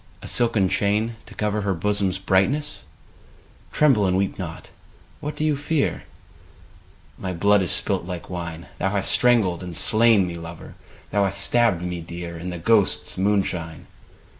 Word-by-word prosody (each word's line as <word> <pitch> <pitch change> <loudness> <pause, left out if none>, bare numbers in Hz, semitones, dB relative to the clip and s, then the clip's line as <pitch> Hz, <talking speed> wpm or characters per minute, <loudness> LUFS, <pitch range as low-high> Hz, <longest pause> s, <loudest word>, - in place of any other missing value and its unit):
A - - -7
silken 115 -5 +2
chain, 105 +4 0
to - - -12
cover 105 0 -1
Her 100 -2 0
bosom's 100 +1 0
brightness? 105 +11 +1 0.9
(Tremble 130 -10 +4
and 90 0 +2
weep 95 0 -1
not: - - -6 0.5
what 150 +1 -5
dost 155 - -1
thou 155 - +3
fear 150 -2 0 0.4
?) - - -25
— - - -32 0.3
My 95 -1 -3
blood 100 +3 +4
is 90 - -1
spUt 85 - 0
like 90 -2 -6
wine, 85 -2 -6
Thou 95 - +1
hast 100 -1 -1
strangled 110 -8 +3
and 90 -2 -7
slain 110 -3 +4
me, 85 - -4
lover. 85 0 -9 0.4
Thou 100 - +2
hast 100 +1 -3
stabbed 115 -8 +2
me 90 -1 -3
dear. 85 0 -7
In 85 +2 -5
the 90 - -4
ghosts' 105 +3 +2
moonshine. 95 -4 -1
95 Hz, 165 wpm, -23 LUFS, 90-110 Hz, 0.9 s, Tremble